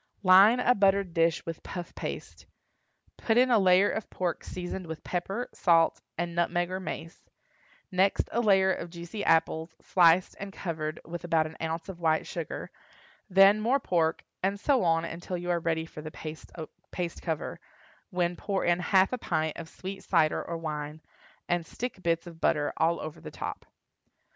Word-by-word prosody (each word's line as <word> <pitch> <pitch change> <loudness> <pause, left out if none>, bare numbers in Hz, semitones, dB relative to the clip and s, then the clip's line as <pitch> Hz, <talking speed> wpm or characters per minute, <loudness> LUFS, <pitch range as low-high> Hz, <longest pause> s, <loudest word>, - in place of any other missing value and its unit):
Line 195 +6 +7
a 250 0 +4
buttered 195 -4 +2
dish 165 -1 +2
with 165 -1 -5
puff 175 -2 -7
paste; - - -7 0.7
put 225 0 +1
in 255 +1 +5
a 230 - +6
layer 190 +1 +5
of 220 - -4
pork 175 -4 -2
seasoned 180 0 -6
with 160 0 -7
pepper, 195 +7 -3
salt, 165 -2 +3 0.2
and 170 0 -2
nutmeg 175 +1 0
or 185 - -2
mace; 165 -2 -7 0.6
next 190 +1 +2
a 235 - +1
layer 190 -3 +4
of 170 - -6
juicy 170 +4 -6
apples, 160 0 +1
sliced 175 0 +4
and 200 0 -6
covered 160 -5 -4
with 175 +1 -6
about 165 -2 +2
an 155 0 -8
ounce 165 +1 -3
of 190 -3 -8
white 160 -2 +2
sugar; - - -5 0.6
then 195 +3 +6
more 250 +6 +2
pork, 165 -8 0 0.2
and 195 +2 0
so 260 +2 +2
on 165 -1 +2
until 175 +2 -5
you 175 0 -2
are 170 - +1
ready 160 -1 -1
for 155 - -10
the 155 - -6
paste 170 +3 -7
cover, 160 -4 -3 0.5
when 175 -1 0
pour 195 +2 -2
in 175 0 +3
half 190 +4 +3
a 250 - -2
pint 155 -6 -1
of 165 -1 -8
sweet 190 +1 -7
cider 160 -4 +2
or 170 - -4
wine, 150 -1 -5 0.5
and 175 -1 +1
stick 230 +4 -6
bits 165 -1 0
of 170 -2 -12
butter 145 -1 +1
all 165 +1 +2
over 155 -1 -7
the - - -8
top. - - -6
175 Hz, 175 wpm, -28 LUFS, 165-190 Hz, 0.7 s, Line